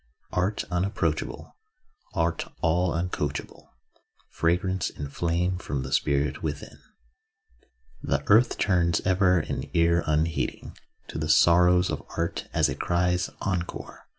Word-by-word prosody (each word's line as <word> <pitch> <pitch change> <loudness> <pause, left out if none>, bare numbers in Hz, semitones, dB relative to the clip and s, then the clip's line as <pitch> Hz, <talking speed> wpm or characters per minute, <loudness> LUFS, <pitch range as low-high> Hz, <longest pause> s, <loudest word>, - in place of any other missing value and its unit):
Art 95 +4 0
unapproachable, 90 +4 -2 0.6
Art 85 -2 -1
all 85 +2 +2
uncoachable, 80 -3 -3 0.6
Fragrance 90 +2 0
and 70 -1 -8
flame 90 +2 0
from 70 -6 -3
the 65 - -7
spirit 70 -1 +1
within. 75 -2 -5 1.2
The 70 +1 -1
earth 110 +4 +4
turns 85 -4 +2
ever 95 -1 +3
an - - -5
ear 85 0 +3
unheeding 75 0 -1 0.3
To - - -5
the 75 0 -3
sorrows 90 +3 +5
of - - -3 0.2
art, 85 0 -2
as - - +3
it - - -5
cries 90 0 +1 0.2
'encore. 90 -3 -4
85 Hz, 120 wpm, -26 LUFS, 80-90 Hz, 1.2 s, sorrows